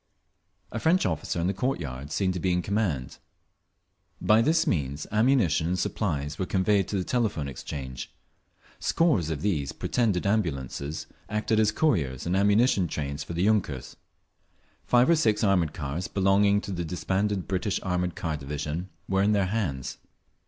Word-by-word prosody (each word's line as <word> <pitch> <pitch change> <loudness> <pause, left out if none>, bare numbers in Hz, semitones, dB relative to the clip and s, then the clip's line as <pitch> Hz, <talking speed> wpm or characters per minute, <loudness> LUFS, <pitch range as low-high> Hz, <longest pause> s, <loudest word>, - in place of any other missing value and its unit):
A 115 - -3
French 170 +9 +3
officer, 80 0 -1
in 85 - 0
the 95 - +1
court 125 +8 -1
yard, 70 -2 -6
seemed 95 0 +1
to 90 - -3
be 90 +2 0
in 90 0 +1
command…. 95 - -1 1.0
By 110 +1 +4
this 160 +6 +3
means 70 - -1
ammunition 105 - +3
and 90 +1 0
supplies 75 -8 -2
were 95 - -1
conveyed 95 0 +2
to 100 - -2
the 95 - 0
Telephone 105 - -1
Exchange. 65 -1 -6 0.7
Scores 145 - +2
of 75 -3 -3
these 75 -10 0
pretended 105 -8 0
ambulances 75 - -1 0.2
acted 110 +1 +1
as 105 -1 +4
couriers 80 - 0
and 85 +2 0
ammunition 100 0 +3
trains 70 -1 -4
for 85 - -7
the 85 +2 0
yunkers. 100 - 0 0.9
Five 125 +1 +5
or 170 - +5
six 110 -9 +2
armoured 95 -6 +3
cars, 75 +4 -3
belonging 100 +1 +3
to 100 - -6
the 85 -2 -2
disbanded 95 +3 -1
British 95 +1 -1
Armoured 90 -1 -1
Car 80 -7 -2
Division, 75 +5 -4 0.2
were 95 0 +2
in 105 +2 +3
their 100 -2 +2
hands. 90 - -2
95 Hz, 160 wpm, -27 LUFS, 75-105 Hz, 1.0 s, Five